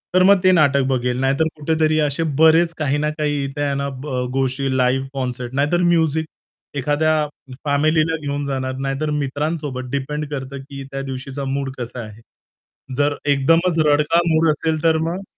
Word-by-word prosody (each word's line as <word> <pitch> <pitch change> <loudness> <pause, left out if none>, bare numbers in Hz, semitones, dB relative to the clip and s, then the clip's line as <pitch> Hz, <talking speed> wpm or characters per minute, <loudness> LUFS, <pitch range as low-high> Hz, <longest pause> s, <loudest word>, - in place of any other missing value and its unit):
तर 185 - +6
मग 200 0 +6
ते 185 - +6
नाटक 140 -5 +4
बघेल. 125 -1 0
नाहीतर 140 +4 +2
कुठेतरी 155 0 +1
असे 150 +2 0 0.2
बरेच 165 +1 +5
काही 145 -2 0
ना 150 +1 0
काही 145 -2 0
इथे 140 +1 -4
आहे 140 -1 0
ना 140 0 -2
ब 130 -4 -2
गोष्टी 135 0 0
लाईव्ह 130 +1 +1
कॉन्सर्ट 125 -2 -4
नाहीतर 150 +6 +1
म्युझिक 160 -2 +2 0.5
एखाद्या 150 +3 +1 0.5
फॅमिलीला 155 +3 +2
घेऊन 145 0 -3
जाणार 130 -1 -2
नाहीतर 135 +3 -1
मित्रांसोबत 145 -2 -3
डिपेंड 150 +2 -2
करतं, 135 -1 -5
की 140 0 -9
त्या 135 0 -4
दिवशीचा 135 +1 -5
मूड 135 0 -2
कसा 125 0 -6
आहे. 110 +1 -12 0.8
जर 145 0 +2
एकदमच 165 +5 +3
रडका 150 +3 +3
मूड 160 0 +3
असेल, 155 +1 -2
तर 160 -1 +4
मग 185 +4 -3
145 Hz, 165 wpm, -20 LUFS, 135-155 Hz, 0.8 s, तर